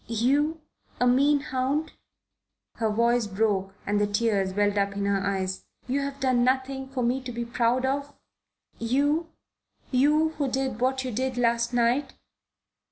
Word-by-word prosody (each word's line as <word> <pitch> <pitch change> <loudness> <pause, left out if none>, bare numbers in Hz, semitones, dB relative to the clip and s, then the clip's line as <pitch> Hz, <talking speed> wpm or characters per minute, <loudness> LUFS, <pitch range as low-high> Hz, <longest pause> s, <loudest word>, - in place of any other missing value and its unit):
"You? 280 +8 +1 0.4
A 250 - +3
mean 280 +4 +4
hound?" 275 +4 -1 0.9
Her 225 -2 0
voice 235 +1 +2
broke 195 -1 0
and 205 0 +1
the 205 - +2
tears 205 -2 +1
welled 205 +1 +1
up 200 -1 0
in 200 - -1
her 200 -1 +1
eyes. 190 -1 -2 0.2
"You 265 +3 0
have 280 0 -4
done 255 -3 +2
nothing 265 +1 0
for 260 -2 -2
me 250 +3 +1
to 255 -1 -6
be 235 0 -4
proud 240 +2 +1
of? 280 +2 -1 0.7
You? 290 +8 +1 0.6
You 300 +5 +3
who 285 - +1
did 260 -3 -2
what 260 +1 +1
you 255 - -3
did 255 +2 -2
last 235 0 +1
night? 245 +3 +1
245 Hz, 160 wpm, -26 LUFS, 220-270 Hz, 0.9 s, mean